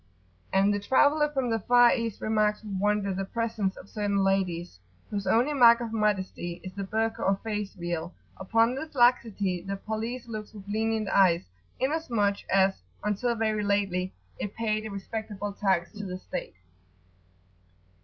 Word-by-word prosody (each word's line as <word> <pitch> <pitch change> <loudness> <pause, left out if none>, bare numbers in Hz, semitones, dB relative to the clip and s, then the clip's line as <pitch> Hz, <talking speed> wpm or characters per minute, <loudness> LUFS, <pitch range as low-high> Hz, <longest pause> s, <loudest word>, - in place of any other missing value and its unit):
And 195 +2 +3
the 205 - 0
traveller 290 +7 +3
from 265 -5 -1
the 225 - +1
far 245 +3 +5
East 230 -4 -3
remarks 215 0 +1
with 210 -2 -6
wonder 205 -1 +1
the 195 +1 -2
presence 215 -2 -2
of - - -11
certain 200 -2 0
ladies, 180 - 0 0.3
whose 200 -2 -3
only 245 +9 +3
mark 235 -4 +7
of 235 -2 -5
modesty 190 -5 -1
is 185 - -7
the 200 - -4
Burka, 220 +3 -1
or 195 - +3
face 210 -2 -3
veil: 175 -1 -3 0.3
upon 225 +5 +2
this 305 +3 -6
laxity 225 -7 +2
the 195 +2 -4
police 225 +4 -4
looks 215 -1 -7
with 200 -1 -11
lenient 220 +1 0
eyes, 180 -4 +4 0.4
inasmuch 245 -9 +1
as, 195 0 +3 0.2
until 210 +4 0
very 215 -1 0
lately, 195 -2 0 0.3
it 205 - -4
paid 215 -1 -1
a - - -7
respectable 205 0 -5
tax 190 -4 0
to 210 -1 -8
the 185 -2 -4
state. 185 - -6
210 Hz, 160 wpm, -28 LUFS, 195-230 Hz, 0.4 s, mark